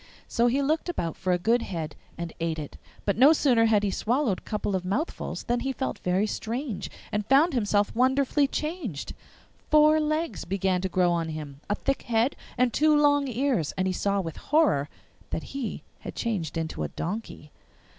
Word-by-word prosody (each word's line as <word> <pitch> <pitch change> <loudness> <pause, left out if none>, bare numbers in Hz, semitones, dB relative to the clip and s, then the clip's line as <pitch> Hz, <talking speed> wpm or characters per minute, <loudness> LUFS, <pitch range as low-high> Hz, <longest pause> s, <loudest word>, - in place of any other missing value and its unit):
So 235 +1 +2
he 270 +4 +2
looked 310 +5 0
about 170 - -2
for 185 - -1
a 180 - +3
good 230 +7 +2
head 165 -7 -4 0.2
and 170 -1 -5
ate 165 -1 -1
it, 150 -2 -7 0.3
but 200 +2 0
no 280 +5 +8
sooner 250 -7 +4
had 215 -2 +3
he 200 - +1
swallowed 235 -1 0
a - - -26
couple 210 -2 -2
of 185 - -1
mouthfuls 205 - -3
than 240 0 0
he 270 +2 -1
felt 265 0 -3
very 185 +3 +1
strange, 230 +2 -4 0.2
and 210 0 0
found 290 +5 +5
himself 205 -4 +1
wonderfully 265 +3 +3
changed. 300 - -4 0.6
Four 305 +1 +6
legs 310 - -1
began 190 -1 0
to 190 - -1
grow 180 -1 +2
on 165 -1 0
him, 150 -3 -7
a 205 - +2
thick 275 +4 -1
head, 235 +3 +1 0.2
and 250 -1 +2
two 305 0 +4
long 290 -1 +4
ears, 250 - 0
and 185 - +1
he 190 - 0
saw 200 +2 0
with 165 -4 -6
horror 280 - +2 0.4
that - - -3
he 275 -5 -4 0.2
had - - -8
changed 190 -10 -2
into 160 - -3
a 75 - 0
donkey. 175 - -6
225 Hz, 190 wpm, -27 LUFS, 180-275 Hz, 0.6 s, no